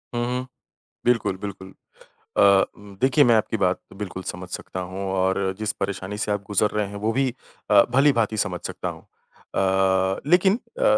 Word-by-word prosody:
हुँ, 120 - 0
हुँ। 125 +1 -2 0.6
बिल्कुल, 115 -6 +2
बिल्कुल। 95 -1 -8 0.6
अ, - - +5 0.4
उम, 100 -1 -13
देखिए 135 +2 +5
मैं 120 -2 +5
आपकी 110 +1 +1
बात 95 -2 +1 0.2
बिल्कुल 95 -2 -6
समझ 90 0 -6
सकता 95 - -6
हूँ 95 +1 -5
और 95 0 +1
जिस 110 -1 0
परेशानी 100 +1 -3
से 105 -1 -1
आप 105 -1 -1
गुज़र 105 +1 +2
रहे 105 -1 -1
हैं, 100 - -9
वो 105 +2 -1
भी 135 +1 +2 0.4
अ, 100 -1 +8
भली-भाँति 120 -5 +3
समझ 90 -4 -1
सकता - - -4
हूँ। - - -9 0.5
अ, 95 0 +2
लेकिन 185 +3 +5 0.2
अ, - - +1
100 Hz, 175 wpm, -24 LUFS, 95-115 Hz, 0.6 s, अ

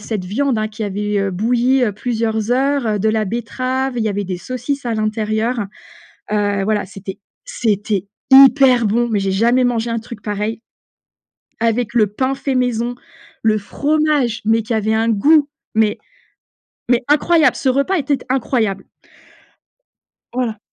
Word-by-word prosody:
cette 210 -3 -4
viande, 250 +5 0
hein, 215 - 0
qui 215 +1 -7
avait, 205 0 -2
heu, 195 -1 0
bouillie 245 +6 +2
heu, 210 - -1
plusieurs 220 0 -2
heures, 270 0 +1
heu, 210 -1 0
de 220 - +1
la 220 0 +1
betterave, 255 +4 -3
il 230 - 0
y - - +1
avait 205 -1 -2
des 185 -1 -4
saucisses 255 +6 -4
à 235 - -1
l'intérieur. 215 +1 -1 0.7
Heu, 205 -1 0
voilà 210 -2 0
c'était 195 +1 -9 0.3
c'était 215 - -1 0.2
hyper 265 -3 +7
bon 235 +3 +1
mais 210 - +1
j'ai 195 -1 -1
jamais 235 +6 +3
mangé 235 -1 0
un 230 - -1
truc 225 -2 -10
pareil, 210 +2 -3 1.0
avec 230 0 0
le 220 -3 +3
pain 260 +6 -1
fait 270 -1 -2
maison, 245 -1 0 0.5
le 215 -1 +3
fromage, 290 0 0
mais 225 +1 +2
qui 230 +2 -3
avait 220 0 0
un 225 +1 +1
goût 290 +8 +4 0.3
mais 220 -1 +2 0.9
mais 245 0 +3
incroyable. 305 -1 +3
Ce 265 - 0
repas 280 +9 +1
était 285 -1 0
incroyable! 225 -6 -1 1.4
Voilà. 240 -3 -2
230 Hz, 155 wpm, -18 LUFS, 210-255 Hz, 1.4 s, hyper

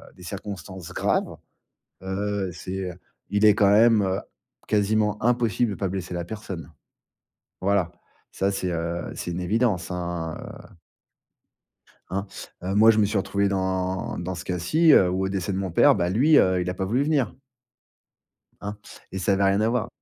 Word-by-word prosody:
des 90 - -14
circonstances 95 -1 -7
graves, - - 0 0.7
heu, 100 0 -2
c'est 95 +1 -5 0.4
il 105 +1 +3
est 105 -1 +7
quand 100 -2 +4
même, 110 0 +5
heu, 95 0 0 0.5
quasiment 105 0 +1
impossible 120 -1 +2
de - - -4
pas 100 - -2
blesser 90 -1 -5
la 85 0 -3
personne. 90 -5 -7 0.9
Voilà, 95 -3 +1 0.4
ça 95 - 0
c'est, 95 -2 -2
heu, 85 0 -3
c'est 85 - -5
une 85 +1 -3
évidence, 100 -1 0
hein, 85 -2 -4
heu - - -11 1.4
hein, 100 +2 -2 0.4
moi 105 +5 +5
je 110 - +2
me 105 - +5
suis 100 0 0
retrouvé 100 +1 0
dans 95 -1 -2
dans 90 +2 -4
ce 90 - -7
cas-ci, 150 - +3
heu, 90 - +6
où 95 +1 -1
au - - 0
décès 95 0 -2
de 95 - -2
mon 95 -1 -2
père, 140 - +5
bah, 90 -3 0
lui, 135 - +4
heu, 95 -1 +3
il 90 0 -2
a - - -4
pas 95 - -2
voulu 120 +7 +1
venir 145 -4 +1 1.3
hein 105 +1 -5 0.4
et 95 - -3
ça 95 +2 +1
avait 100 0 +2
rien 95 +1 +3
à 110 - +2
voir. 120 -1 0
95 Hz, 175 wpm, -25 LUFS, 90-105 Hz, 1.4 s, est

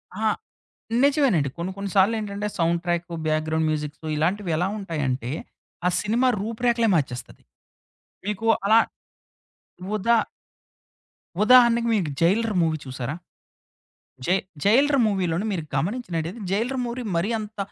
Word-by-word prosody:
ఆహా! 215 +1 +1 0.7
నిజమేనండి. 270 - +3
కొన్ని 175 +3 -3
కొన్ని 200 -1 -4
సార్లు 200 +4 +4
ఏంటంటే, 205 0 -3
సౌండు 170 0 +2
ట్రాకు, 175 0 -1
బ్యాక్‌గ్రౌండ్ 155 +1 0
మ్యూజిక్సు 150 0 -4
ఇలాంటివి 180 +4 0
ఎలా 180 +3 +1
ఉంటాయంటే, 135 - -2 0.5
ఆ - - +5
సినిమా 235 +5 +1
రూపు 225 +2 -5
రేఖలే 235 -1 +3
మార్చేస్తది. 130 -6 -3 0.8
మీకు 210 +2 -2 0.2
అలా 220 +3 +6 1.2
ఉదా 230 +3 +3 1.3
ఉదాహరణకి 235 0 +6
మీకు 180 -7 0
'జైలర్' 205 +5 +2
మూవీ 160 -1 0
చూసారా? 130 +2 -4 1.1
జై 180 - +3 0.3
జైలర్ 275 +7 +4
మూవీలోని 190 -2 0
మీరు 170 -4 -3
గమనించినట్టయితే 175 - -2
'జైలర్' 240 +6 0
మూవీ 240 +1 -4
మరి 170 +5 +1
అంత, 215 0 -8
195 Hz, 120 wpm, -24 LUFS, 165-225 Hz, 1.3 s, అలా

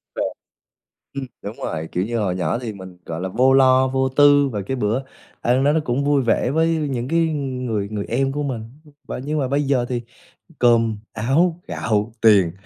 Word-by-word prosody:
À, - - -2 0.9
ừm, 140 -1 -4 0.2
đúng - - -7
rồi. 80 +1 -4
Kiểu 90 - 0
như 115 +1 -2
hồi 95 -4 0
nhỏ 90 +4 -1
thì 115 -4 -5
mình, 95 -2 -11
gọi 80 +1 -5
là, 95 - -3
vô 130 +7 +3
lo, 130 -1 +5
vô 130 0 0
tư 145 +1 +5
và 105 -4 -3
cái 130 +7 -3
bữa 115 +4 0 0.4
ăn 125 +3 +2
đó, 145 +1 +3
nó 160 - +2
cũng 125 +3 0
vui 145 -1 +3
vẻ 120 +1 +1
với 160 +3 +2
những 135 -6 -2
cái 165 +4 +1 0.2
người 125 -7 -3
người 105 -2 -4
em 135 +3 0
của 145 +1 -3
mình, 125 -6 -3 0.4
và - - -5
nhưng 150 +4 -2
mà 135 - 0
bây 140 +3 0
giờ 135 -3 +1
thì 120 -2 -2 0.6
cơm, 115 -3 +3 0.2
áo, 160 +10 +1
gạo, 105 0 -1
tiền 100 -6 +5
125 Hz, 205 wpm, -21 LUFS, 110-140 Hz, 0.9 s, lo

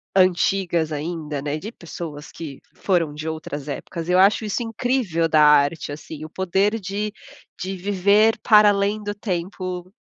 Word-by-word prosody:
antigas 180 -3 +2
ainda, 150 -1 -4
né, 145 +1 -2
de 205 +8 -7
pessoas 160 -6 -8
que 150 -5 -8 0.2
foram 170 -6 0
de 155 +2 -6
outras 155 -2 -5
épocas, 165 +3 -5
eu 180 +1 +4
acho 200 +3 +4
isso 210 +3 -2
incrível 225 -7 0
da 155 -1 +4
arte, 150 +1 +4
assim, 150 +1 -8
o 155 - -7
poder 190 +5 0
de 205 +2 -3 0.5
de 190 +1 -4
viver 200 +4 +3
para 210 -2 +7
além 205 +1 +1
do 205 0 -4
tempo 185 -2 -4
180 Hz, 155 wpm, -22 LUFS, 155-205 Hz, 0.5 s, para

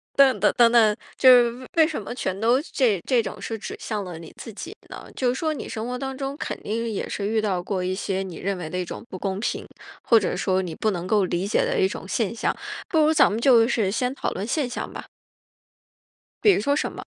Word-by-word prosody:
等 265 -6 +5
等 210 - +4
等 235 -1 +6
等， 220 -3 +5 0.2
就 260 - +6
是 245 -2 +7
为 250 +2 -11 0.2
为 - - +3
什 315 - -4
么 205 - -6
全 190 -6 -3
都 235 +5 +3
这 230 -8 +2
这 250 -3 +3
种 - - -7
是 225 - -4
指 215 - -7
向 210 -2 -3
了 180 -3 -7
你 165 - -11
自 225 - -8
己 340 - -8
呢？ - - -9
就 255 - +1
是 245 - 0
说 315 +3 -1
你 - - -6
生 220 +1 -5
活 250 0 -3
当 265 +1 -4
中 275 0 -4
肯 - - -5
定 230 +3 -2
也 215 - -3
是 200 - -3
遇 220 +1 +1
到 195 -4 -1
过 190 -1 -2
一 185 +1 -1
些 190 -1 -2
你 180 -4 -8
认 195 0 -2
为 170 -3 -6
的 180 - -4
一 180 - -2
种 - - -7
不 185 - -7
公 195 0 -2
平， 225 - -3 0.4
或 230 - +5
者 - - -2
说 190 -1 +1
你 175 -3 -5
不 215 - 0
能 175 -2 -4
够 205 -1 +3
理 180 +2 -2
解 245 - +2
的 - - 0
一 385 - +4
种 - - -7
现 - - -1
象。 - - -1 0.3
不 320 - +2
如 310 0 +4
咱 310 - +5
们 215 - -2
就 235 -3 +6
是 220 -6 +1
先 250 +4 -1
讨 - - -2
论 195 - -4
现 265 0 -1
象 - - -5
吧。 - - -7 1.4
比 415 - +7
如 - - +2
说 285 +7 +1
什 - - -1
么？ - - -9
225 Hz, 280 characters per minute, -24 LUFS, 195-260 Hz, 1.4 s, 是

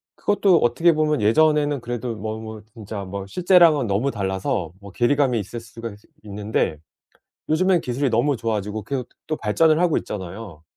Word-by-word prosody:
그것도 200 -4 +3
어떻게 165 +8 +3
보면 150 -4 +1
예전에는 145 +4 +3
그래도 120 -1 -4
뭐 110 +1 -5
뭐 110 -1 -8
진짜 105 -3 -7
뭐 95 +1 -6
실제랑은 170 - +4
너무 105 +8 0
달라서 95 -4 -2
뭐 100 -1 -12
괴리감이 125 +2 +2
있을 110 +4 -6
수가 115 -1 -9
지 - - -25 0.2
있는데 105 -6 -2 0.7
요즘엔 180 +2 +3
기술이 130 +1 -1
너무 125 +4 +2
좋아지고 110 -2 -3
계속 130 -1 -4 0.2
또 155 - -1
발전을 155 +9 +2
하고 175 -3 +2
있잖아요. 95 -3 -7
115 Hz, 370 characters per minute, -22 LUFS, 105-150 Hz, 0.7 s, 실제랑은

